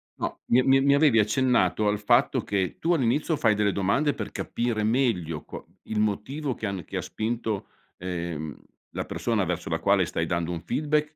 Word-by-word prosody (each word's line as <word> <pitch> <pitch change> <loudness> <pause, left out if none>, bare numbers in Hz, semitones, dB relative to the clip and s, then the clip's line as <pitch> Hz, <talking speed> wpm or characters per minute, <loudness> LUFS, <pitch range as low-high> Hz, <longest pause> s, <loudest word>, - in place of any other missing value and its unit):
No, - - -4
mi 120 - +5
e - - +3
mi 135 +1 +4
mi 140 +1 +4
avevi 140 -6 +5
accennato 110 0 +2
al 105 0 +1
fatto 120 +4 +3
che 95 -3 -1
tu 170 +2 +2
all'inizio 150 +2 +1
fai 115 -4 +3
delle 105 -1 +1
domande 100 +11 +1
per 105 -2 -5
capire 115 -3 -2
meglio 105 - 0
qua - - -9 0.2
il 110 - -3
motivo 125 +7 -1
che - - -5
hanno 100 -3 -3
che - - -6
ha - - -1
spinto, 110 -2 -3 0.3
ehm, 85 -4 -4 0.3
la - - -4
persona 115 -4 -1
verso 90 -1 -3
la 80 - 0
quale 100 -2 +3
stai 80 0 -2
dando 85 0 -1
un 85 -2 -5
feedback 150 +1 0
110 Hz, 195 wpm, -26 LUFS, 95-130 Hz, 0.3 s, mi